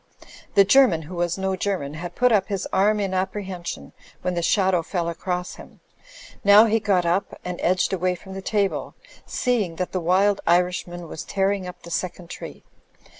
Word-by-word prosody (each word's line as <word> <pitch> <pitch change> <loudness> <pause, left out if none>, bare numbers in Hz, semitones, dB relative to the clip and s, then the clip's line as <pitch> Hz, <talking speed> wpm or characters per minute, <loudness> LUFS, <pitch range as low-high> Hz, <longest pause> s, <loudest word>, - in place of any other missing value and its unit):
The 200 - +7
German, 205 -8 +5
who 175 +4 -9
was 175 0 -1
no 190 0 -1
German, 180 -7 -2
had 175 +2 -7
put 250 0 +3
up 205 -4 +3
his 200 -3 -3
arm 210 +2 +3
in 195 -2 -1
apprehension 185 - -4 0.3
when 180 0 0
the 170 - -1
shadow 185 -1 +2
fell 170 0 -3
across 180 +1 -3
him. - - -14 0.6
Now 205 +2 +8
he 225 0 +2
got 195 -5 +1
up 175 +4 -1
and 180 -1 -4
edged 185 +2 +1
away 180 0 0
from 190 +2 -11
the 195 - -6
table; 200 -1 -1 0.3
seeing 215 -9 0
that 180 +1 -3
the 185 - -1
wild 195 +4 +2
Irishman 175 0 +1
was 155 - -7
tearing 195 -1 -1
up 180 - -10
the 170 - -10
second 175 0 -4
tree. - - -9
185 Hz, 180 wpm, -23 LUFS, 175-200 Hz, 0.6 s, Now